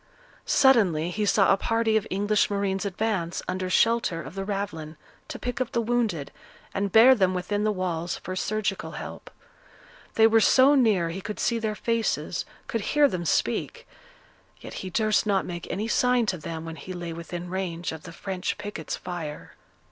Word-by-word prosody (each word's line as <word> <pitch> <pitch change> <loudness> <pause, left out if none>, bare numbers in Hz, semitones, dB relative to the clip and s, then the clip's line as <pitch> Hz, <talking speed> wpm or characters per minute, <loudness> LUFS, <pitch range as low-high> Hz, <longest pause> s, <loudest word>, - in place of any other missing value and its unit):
Suddenly 185 - +4
he 210 +2 -1
saw 195 -1 +4
a - - +2
party 225 +1 +1
of 220 -1 +1
English 205 +2 +1
marines 200 -1 -1
advance, 195 -3 -2
under 185 0 -2
shelter 230 -4 +2
of 145 -2 -8
the 195 0 -4
ravelin, 175 -6 -4 0.3
to - - -6
pick 245 0 -4
up 255 - -2
the 235 - +1
wounded, 225 -10 -1 0.4
and 200 0 -1
bear 235 +6 +8
them 190 -6 +2
within 205 +3 -1
the 215 - +2
walls 175 -3 -2
for 185 - -6
surgical 205 0 -2
help. - - -8 0.9
They 220 - +6
were 225 0 +5
so 265 +6 +6
near 215 -11 +3
he 180 +4 -5
could 210 +2 -6
see 235 -1 +1
their 215 -1 -2
faces, 230 0 -1 0.2
could 230 - -2
hear 295 +7 +4
them 180 -9 -3
speak; 475 - -1 0.7
yet - - -9
he 190 - -5
durst 215 +1 +1
not 195 -2 +2
make 175 -1 -6
any 210 +4 -2
sign 250 0 +2
to 190 -3 -1
them 165 0 -6
when 165 0 -7
he 185 - -7
lay 175 -2 -5
within 170 +1 -6
range 180 -2 -3
of 160 -1 -7
the 165 - -10
French 185 +1 -4
picket's 205 -6 -5
fire. 165 -4 -7
195 Hz, 180 wpm, -26 LUFS, 175-225 Hz, 0.9 s, bear